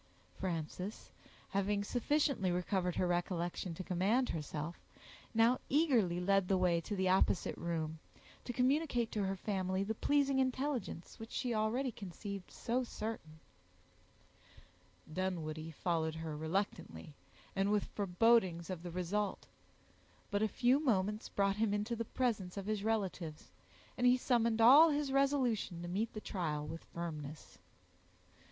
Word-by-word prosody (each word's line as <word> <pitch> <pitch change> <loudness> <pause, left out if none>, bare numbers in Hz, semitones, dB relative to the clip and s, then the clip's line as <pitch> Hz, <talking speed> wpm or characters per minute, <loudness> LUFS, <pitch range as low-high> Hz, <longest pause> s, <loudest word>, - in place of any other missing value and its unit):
Frances, 180 +3 -4 0.4
having 200 +1 0
sufficiently 255 -2 +1
recovered 180 0 0
her - - +1
recollection 175 0 -1
to 185 - -5
command 200 +9 +1
herself, 155 +1 -4 0.5
now 230 +2 +4
eagerly 245 - +3
led 195 +1 +2
the 190 - +3
way 175 -2 +2
to 205 - -4
the 190 -1 +1
opposite 185 0 +2
room, 160 -2 -3 0.4
to - - -4
communicate 250 -1 +1
to 210 -2 -1
her 190 0 -1
family 190 -1 -1
the 215 +3 -1
pleasing 275 +3 +2
intelligence 260 - -2
which 225 0 -8
she 245 -2 -2
already 230 +5 0
conceived 200 -1 -7
so 245 +2 -1
certain, 215 -9 -6 1.7
Dunwoodie 160 -3 -3
followed 160 0 -1
her 160 -1 -4
reluctantly, 160 - -3 0.4
and 195 +1 +2
with 210 -1 +2
forebodings 190 -3 +2
of 180 -3 -5
the 175 - -6
result; 185 +4 -2 0.9
but 205 0 +1
a 220 - +3
few 250 +5 +3
moments 210 -6 0
brought 200 0 +1
him 215 -1 +2
into 210 +3 -1
the 230 0 -3
presence 210 -7 -1
of 195 - -4
his 210 -1 -1
relatives, 190 -8 -2 0.4
and 250 - +3
he 250 +1 +6
summoned 235 -3 +2
all 285 +8 +9
his 290 -2 0
resolution 255 -10 +1
to - - -4
meet 205 +6 -1
the 215 - -4
trial 155 -8 -2
with 165 +2 -7
firmness. 155 -3 -7
200 Hz, 140 wpm, -35 LUFS, 175-235 Hz, 1.7 s, all